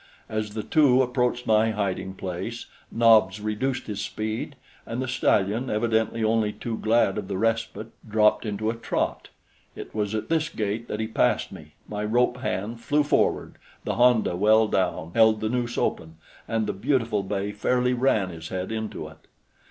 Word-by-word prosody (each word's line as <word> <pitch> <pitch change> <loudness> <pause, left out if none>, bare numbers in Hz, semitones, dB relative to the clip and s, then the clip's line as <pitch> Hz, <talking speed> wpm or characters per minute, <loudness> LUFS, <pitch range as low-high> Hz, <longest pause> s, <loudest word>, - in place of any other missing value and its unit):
As 110 -1 -4
the 110 - -3
two 135 -3 +4
approached 125 -1 0
my 110 +1 +3
hiding 100 -3 -2
place, 95 +6 -5 0.3
Nobs 110 -4 +4
reduced 110 +5 -2
his 105 -2 -4
speed, 110 +6 -4 0.3
and 115 +2 -5
the 130 - -2
stallion, 120 -1 +1
evidently 110 0 0
only 110 -1 +2
too 115 +1 -5
glad 110 -3 +2
of 100 - -7
the 95 -1 -3
respite, 115 0 -1 0.2
dropped 105 0 +3
into 110 0 -2
a - - -6
trot. 115 - -2 0.5
It - - -9
was 105 0 -1
at 110 - -3
this 160 -1 +1
gait 110 +1 -3
that 105 - -4
he 110 - 0
passed 110 - +1
me; 75 0 -12
my 105 0 -4
rope 120 +3 +2
hand 115 -2 -3
flew 150 +3 +2
forward; 145 - 0 0.2
the - - -2
honda, 120 -6 +3
well 110 +4 +4
down, 90 -5 -1
held 110 -1 +5
the 110 - -1
noose 120 0 -2
open, 80 0 -2 0.3
and 110 -1 0
the 105 - -2
beautiful 115 -1 0
bay 100 +1 -3
fairly 125 +4 +1
ran 120 -6 +1
his 80 -1 -8
head 95 +2 -4
into 110 -1 -4
it. - - -16
110 Hz, 175 wpm, -25 LUFS, 105-120 Hz, 0.5 s, held